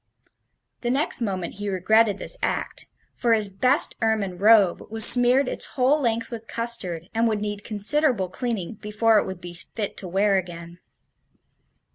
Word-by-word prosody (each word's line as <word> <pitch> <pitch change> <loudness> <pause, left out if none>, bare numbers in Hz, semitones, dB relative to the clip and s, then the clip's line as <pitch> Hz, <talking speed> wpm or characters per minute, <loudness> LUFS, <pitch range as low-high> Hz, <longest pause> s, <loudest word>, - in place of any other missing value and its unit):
The 240 - -2
next 275 +1 0
moment 190 -6 -3
he 205 0 -3
regretted 205 +2 +2
this - - -2
act, - - -3 0.3
for 235 -1 +1
his 210 -2 0
best 255 +9 +2
ermine 210 -5 -1
robe 205 -3 +4
was 220 0 +4
smeared 250 +2 +5
its - - -1
whole 275 +4 +2
length 230 -2 -1
with 225 -1 -8
custard, 190 -8 -3
and 230 +1 +1
would 215 -2 -1
need 205 0 -5
considerable 220 0 0
cleaning 215 0 -5
before 215 +1 +2
it - - -3
would 190 -2 -7
be 175 -1 -9
fit 200 +4 -3
to 190 - -6
wear 195 +2 +1
again. 170 -1 -10
215 Hz, 160 wpm, -23 LUFS, 190-235 Hz, 0.3 s, smeared